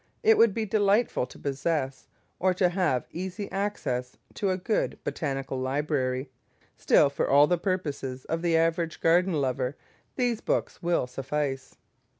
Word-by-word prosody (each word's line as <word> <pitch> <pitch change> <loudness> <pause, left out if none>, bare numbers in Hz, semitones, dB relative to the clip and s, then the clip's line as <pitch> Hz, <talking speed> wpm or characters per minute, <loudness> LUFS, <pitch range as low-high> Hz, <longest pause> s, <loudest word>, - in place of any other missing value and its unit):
It 445 0 +6
would 230 - +4
be 225 -1 -1
delightful 205 - +2
to - - -14
possess, 140 -1 -2 0.3
or 185 0 +2
to 180 -1 +3
have 175 -9 0
easy 190 +3 -5
access 130 -11 -2 0.2
to, 200 - -1
a 185 - +1
good 200 +4 -1
botanical 135 -3 -3
library; 130 -1 -1 0.4
still, 140 - +4
for 140 - -1
all 145 +1 +7
the 175 +2 +1
purposes 145 -9 -3
of 165 0 -2
the 170 -1 +2
average 165 0 0
garden 175 +3 +3
lover, 130 -2 -1 0.4
these 245 -3 0
books - - -1
will 170 -6 +1
suffice. 135 +1 -3
165 Hz, 150 wpm, -27 LUFS, 135-185 Hz, 0.4 s, all